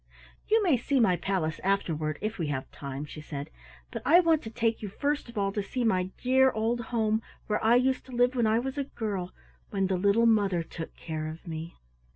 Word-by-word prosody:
"You 440 Hz, 0 st, +4 dB
may 330 Hz, -9 st, +4 dB
see 270 Hz, +3 st, +1 dB
my 190 Hz, -7 st, +4 dB
palace 175 Hz, -4 st, -1 dB
afterward, 160 Hz, -6 st, 0 dB
if 215 Hz, -1 st, -3 dB
we 165 Hz, -, -1 dB
have 135 Hz, -2 st, -3 dB
time," 140 Hz, +1 st, -6 dB
she 150 Hz, +1 st, -9 dB
said, 145 Hz, -2 st, -6 dB, 0.4 s
"but -, -, -5 dB
I 335 Hz, +4 st, +7 dB
want 330 Hz, -3 st, +3 dB
to 220 Hz, -, -7 dB
take 225 Hz, 0 st, 0 dB
you 210 Hz, -, -4 dB
first 285 Hz, +5 st, -2 dB
of 235 Hz, -, -10 dB
all 195 Hz, -1 st, +1 dB
to 205 Hz, -, -1 dB
see 245 Hz, +5 st, -3 dB
my 185 Hz, -5 st, +2 dB
dear 265 Hz, +1 st, +4 dB
old 230 Hz, 0 st, 0 dB
home 220 Hz, -2 st, +1 dB, 0.2 s
where 210 Hz, -, -1 dB
I 225 Hz, +2 st, +5 dB
used 255 Hz, +1 st, +2 dB
to -, -, -11 dB
live 245 Hz, +1 st, +3 dB
when 235 Hz, -3 st, +2 dB
I 220 Hz, +1 st, +3 dB
was 265 Hz, +4 st, -2 dB
a 280 Hz, -, -1 dB
girl, 200 Hz, -8 st, -4 dB, 0.4 s
when 195 Hz, -2 st, 0 dB
the 190 Hz, -1 st, 0 dB
little 200 Hz, +5 st, +3 dB
mother 200 Hz, -6 st, +3 dB
took 165 Hz, 0 st, -8 dB
care 155 Hz, -2 st, -4 dB
of 160 Hz, +3 st, -8 dB
me." 165 Hz, +1 st, -6 dB
215 Hz, 220 wpm, -28 LUFS, 175-245 Hz, 0.4 s, I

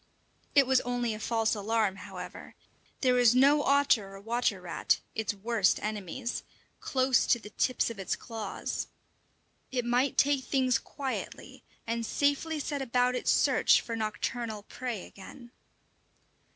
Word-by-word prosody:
It 280 Hz, -1 st, +7 dB
was 260 Hz, 0 st, +3 dB
only 245 Hz, -2 st, -1 dB
a 215 Hz, -, -6 dB
false 225 Hz, 0 st, +1 dB
alarm, 210 Hz, -2 st, 0 dB
however; -, -, -9 dB, 0.5 s
there 255 Hz, -2 st, +4 dB
was 245 Hz, -1 st, +5 dB
no 280 Hz, +3 st, +5 dB
otter 275 Hz, -9 st, +2 dB
or -, -, -9 dB
water 225 Hz, -1 st, 0 dB
rat 175 Hz, -2 st, 0 dB
its 220 Hz, 0 st, -1 dB
worst 210 Hz, -1 st, +2 dB
enemies 215 Hz, +3 st, -4 dB, 0.4 s
close 260 Hz, -1 st, +2 dB
to -, -, +4 dB
the 210 Hz, -2 st, -12 dB
tips 255 Hz, -2 st, 0 dB
of 220 Hz, -, -9 dB
it 195 Hz, -, -2 dB
claws. 225 Hz, -4 st, -5 dB, 0.8 s
It 250 Hz, -2 st, -1 dB
might 245 Hz, +3 st, +1 dB
take 280 Hz, -2 st, +3 dB
things 255 Hz, -4 st, +2 dB
quietly, 270 Hz, -2 st, -6 dB, 0.2 s
and 230 Hz, 0 st, -2 dB
safely 285 Hz, +6 st, 0 dB
set 285 Hz, -1 st, -3 dB
about 250 Hz, -1 st, +1 dB
its 250 Hz, -, -1 dB
search -, -, +4 dB
for 230 Hz, -, -5 dB
nocturnal 220 Hz, 0 st, -3 dB
prey 240 Hz, -3 st, -5 dB
again. 240 Hz, +5 st, -13 dB
240 Hz, 140 wpm, -29 LUFS, 215-260 Hz, 0.8 s, It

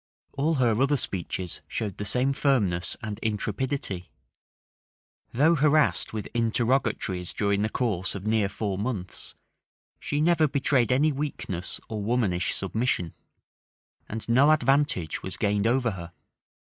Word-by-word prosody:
All 150 Hz, +4 st, +1 dB
her 120 Hz, -3 st, +2 dB
other 140 Hz, +1 st, +3 dB
speeches 90 Hz, -5 st, -4 dB
showed 105 Hz, -5 st, -4 dB
the 105 Hz, -, -4 dB
same 125 Hz, +6 st, +3 dB
firmness 100 Hz, -, +1 dB
and 105 Hz, -2 st, -4 dB
intrepidity: 105 Hz, -2 st, -2 dB, 1.2 s
though 150 Hz, +7 st, +4 dB
harassed 150 Hz, 0 st, +3 dB
with 110 Hz, -1 st, -4 dB
interrogatories 115 Hz, -6 st, 0 dB
during 100 Hz, -1 st, +1 dB
the 110 Hz, -, +1 dB
course 105 Hz, -8 st, -1 dB
of 100 Hz, 0 st, -6 dB
near 110 Hz, -2 st, +2 dB
four 100 Hz, -1 st, -3 dB
months, 100 Hz, -5 st, -4 dB, 0.6 s
she 145 Hz, -, -2 dB
never 160 Hz, 0 st, +4 dB
betrayed 135 Hz, -3 st, +1 dB
any 145 Hz, +5 st, +3 dB
weakness 120 Hz, -, -4 dB
or 110 Hz, -2 st, -4 dB
womanish 100 Hz, -5 st, 0 dB
submission; 100 Hz, -4 st, -1 dB, 1.0 s
and 110 Hz, +1 st, -6 dB
no 130 Hz, +5 st, +5 dB
advantage 140 Hz, -, +2 dB
was 95 Hz, 0 st, -6 dB
gained 105 Hz, 0 st, +1 dB
over 120 Hz, -1 st, +2 dB
her. 85 Hz, -3 st, -8 dB
115 Hz, 130 wpm, -26 LUFS, 100-135 Hz, 1.2 s, no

